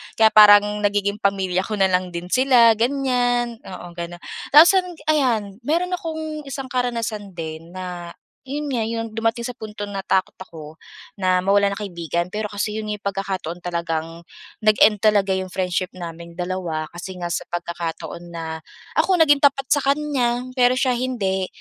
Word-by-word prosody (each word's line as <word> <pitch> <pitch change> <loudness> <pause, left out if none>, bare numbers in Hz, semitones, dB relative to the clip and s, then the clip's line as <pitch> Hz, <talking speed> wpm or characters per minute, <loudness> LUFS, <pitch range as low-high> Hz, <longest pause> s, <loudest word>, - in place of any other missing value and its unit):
Kaya 220 0 +5
parang 210 0 +7
nagiging 205 0 0
pamilya 190 -3 0
ko 215 - -2
na 195 -2 +2
lang 180 -1 0
din 175 +1 -6
sila, 245 -4 +5
ganyan. 245 -2 0
Oo, 180 -2 -8
ganun. 170 0 -7 0.3
Tapos 320 +5 +10
an 375 -2 +2 0.2
ayan, 225 -9 0
mayro'n 345 +4 +1
akong 315 -4 -4
isang 270 -2 -6
karanasan 230 -6 -2
din 165 +1 -7
na, 180 -2 -6 0.3
yun 290 +3 -4
nga, 245 -4 0
yung 225 -1 -4
dumating 225 +1 -1
sa 250 - -7
punto 210 -2 -7
natakot 195 -1 -1
ako 160 -4 -11 0.4
na 185 -2 +2
mawalan 200 +1 +3
ng 200 - -7
kaibigan. 170 -4 -3
Pero 210 +2 -4
kasi 210 +1 -2
yun 220 0 -4
nga 210 - -4
pagkakataon 190 -3 -4
talagang 165 -1 -3 0.4
nag-end 215 -1 +4
talaga 205 -2 +3
yung 190 0 -1
friendship 185 0 -1
naming 170 -1 -8
dalawa 175 -3 -3
kasi 175 +2 -8
nga 175 -1 -4
sa - - -3
pagkakataon 170 -1 -5
na 160 -1 -5 0.4
ako 380 - +3
naging 300 -4 +5
tapat 275 -1 +3
sa 290 - +5
kanya, 275 -4 0 0.2
pero 245 0 +5
siya 255 0 +1
hindi. 220 -7 -1
205 Hz, 160 wpm, -22 LUFS, 180-245 Hz, 0.4 s, Tapos